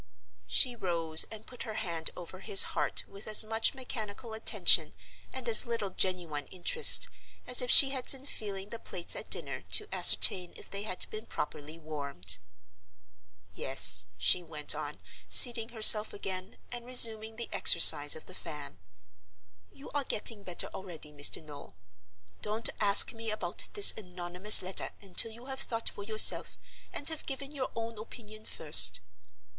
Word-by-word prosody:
She 170 - -1
rose 165 -6 +1
and 220 -1 -13
put 250 - -14
her 220 - -9
hand 170 -7 -5
over 180 +1 -12
his 195 - +5
heart - - -4
with 200 +1 -14
as 215 +1 +1
much 225 +4 -3
mechanical 225 -3 -10
attention 220 - +2 0.4
and - - -9
as 450 - +4
little 230 -4 -6
genuine 170 -7 -4
interest 315 - +4 0.4
as 250 0 0
if 250 - -6
she 275 +1 +4
had 260 -2 -7
been 270 0 -15
feeling 200 -7 -9
the 230 - -8
plates 175 -5 +2
at - - -10
dinner - - -4
to 425 - +4
ascertain 180 -2 +4
if - - -16
they 200 - -7
had 185 -3 -3
been 215 +1 -10
properly 150 +2 -9
warmed. 140 - -5 1.1
"Yes," 100 -5 -3
she 90 - +1
went 155 -3 -3
on, 150 -1 -9 0.3
seating 235 -2 +7
herself 220 -2 +4
again, 190 -1 -9
and 240 -1 -9
resuming 225 -3 0
the 235 +1 -9
exercise 145 -4 +5
of 160 - -13
the 185 - -15
fan; 150 - -10 0.9
"you 275 - -16
are 290 -1 -4
getting 220 -3 -6
better 180 -3 -4
already, 170 -5 -10
Mr. 145 +2 0
Noel.—Don't 95 - -7
ask 205 +3 +1
me 225 0 -10
about 215 - -4
this 410 -1 +8
anonymous 180 +1 0
letter 185 +1 -4
until 200 +3 0
you 235 +3 -16
have 265 0 -9
thought 230 -4 0
for 205 - -12
yourself, 215 +1 +4 0.3
and 285 - -8
have 320 -1 -9
given 275 0 -7
your 270 -3 -7
own 230 -1 -9
opinion 215 -1 -14
first." 95 - +1
200 Hz, 155 wpm, -27 LUFS, 160-230 Hz, 1.1 s, this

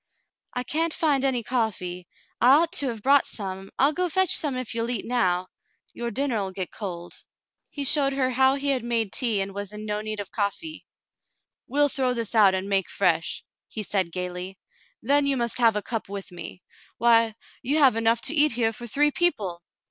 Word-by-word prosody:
" - - -66
I 250 - -1
can't 320 +5 0
find 290 -4 +1
any 255 -3 +1
coffee. 185 -7 -2 0.3
I 250 +3 +7
ought 330 +2 +2
to 290 -7 +2
have 225 -4 -5
brought 280 +1 +4
some; 195 -2 -6
I'll 280 +3 +4
go 360 +2 -1
fetch 375 +1 +4
some 290 -4 0
if 255 -2 -4
you'll 230 0 -2
eat 245 - -2
now. 185 -7 0 0.4
Your 235 0 -4
dinner 265 -1 -1
'11 195 -2 -3
get 185 -2 -5
cold." 175 -4 -8 0.5
He 285 - -5
showed 275 0 +3
her 260 -1 0
how 265 +2 +3
he 280 0 -1
had 260 -4 +2
made 230 -4 -1
tea 230 -6 +1
and 195 0 -4
was 200 0 -6
in 210 0 -8
no 210 0 -2
need 215 -1 -5
of 200 - -7
coffee. 230 +10 -4 0.8
"We'll 290 +2 +2
throw 260 -3 0
this 230 -2 -3
out 205 -4 +5
and 190 +1 -3
make 195 -2 0
fresh," 170 -4 0 0.2
he 215 - -5
said 190 -4 0
gayly. 180 +1 -5 0.5
"Then 280 +4 +3
you 275 -1 +1
must 235 0 -1
have 230 -3 +4
a 210 - -2
cup 225 -4 -4
with 200 -1 -7
me. 175 +1 -9 0.3
Why, 230 -1 +4 0.3
you 285 +5 0
have 270 -6 +5
enough 230 +1 +2
to - - 0
eat 300 -3 +3
here 225 -1 0
for 240 +2 -7
three 295 +6 +2
people 205 - 0
230 Hz, 205 wpm, -25 LUFS, 200-275 Hz, 0.8 s, I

